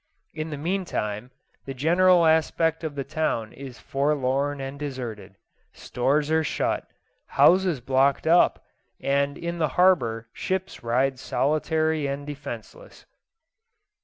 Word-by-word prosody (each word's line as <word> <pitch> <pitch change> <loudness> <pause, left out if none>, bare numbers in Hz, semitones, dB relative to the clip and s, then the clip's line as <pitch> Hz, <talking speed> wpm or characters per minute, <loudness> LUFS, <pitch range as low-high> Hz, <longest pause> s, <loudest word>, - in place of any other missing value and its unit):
In 155 +1 -4
the 150 - -5
meantime, 140 - -3 0.4
the 135 - -6
general 175 +5 +4
aspect 160 0 +2
of 155 -2 -4
the 140 - -3
town 140 -7 -2
is 135 -3 -9
forlorn 140 0 0
and 135 +1 -6
deserted; 120 -9 -6 0.4
stores 145 +5 0
are 160 0 +3
shut, - - -1 0.4
houses 180 -6 +4
blocked 135 +3 +2
up, 170 +2 +3 0.3
and 140 +1 0
in 170 0 -4
the 155 - +2
harbour 120 -12 +3
ships 190 0 -3
ride 130 +3 0
solitary 155 +2 0
and 140 +1 -4
defenceless. 145 - -9
145 Hz, 120 wpm, -25 LUFS, 135-160 Hz, 0.4 s, general